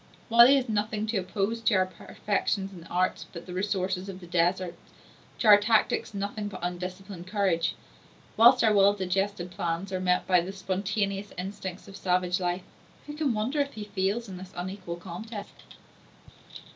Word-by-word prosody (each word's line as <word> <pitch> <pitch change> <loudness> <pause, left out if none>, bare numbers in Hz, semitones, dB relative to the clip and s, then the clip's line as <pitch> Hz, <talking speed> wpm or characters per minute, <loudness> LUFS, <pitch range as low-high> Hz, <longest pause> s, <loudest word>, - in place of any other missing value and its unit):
*a 230 - -17
While 235 +1 +10
he 275 - +6
has 265 -2 +1
nothing 215 0 -1
to 220 0 -1
oppose 195 +4 -1
to 225 -1 +3
our 185 0 +4
perfection 195 +2 -2
in 175 - -10
the 165 - -13
arts 185 +1 0
but 170 -1 -9
the 180 - -8
resources 190 0 -1
of 190 -1 -7
the 180 - -11
desert, 175 +1 +1 0.6
to - - 0
our 205 -1 +9
tactics 215 0 +1
nothing 205 +1 -3
but 200 -4 -8
undisciplined 180 +1 -5
courage; 185 -5 +1 0.6
whilst 240 +3 +7
our 220 -2 +5
well 200 0 +6
digested 190 -1 -1
plans 175 +2 -3
are 185 - 0
met 180 -1 +1
by 180 -2 +4
the 185 +3 -6
spontaneous 195 +1 -2
instincts 190 0 -6
of 195 - -11
savage 180 -1 +1
life, 180 0 -1 0.4
who 295 - -7
can 295 -6 0
wonder 240 +8 -1
if 280 0 0
he 215 - -6
fails 205 +3 -1
in 190 -2 -7
this 185 +1 -10
unequal 185 -1 -5
contest? 200 +5 -9
195 Hz, 180 wpm, -28 LUFS, 180-210 Hz, 0.6 s, While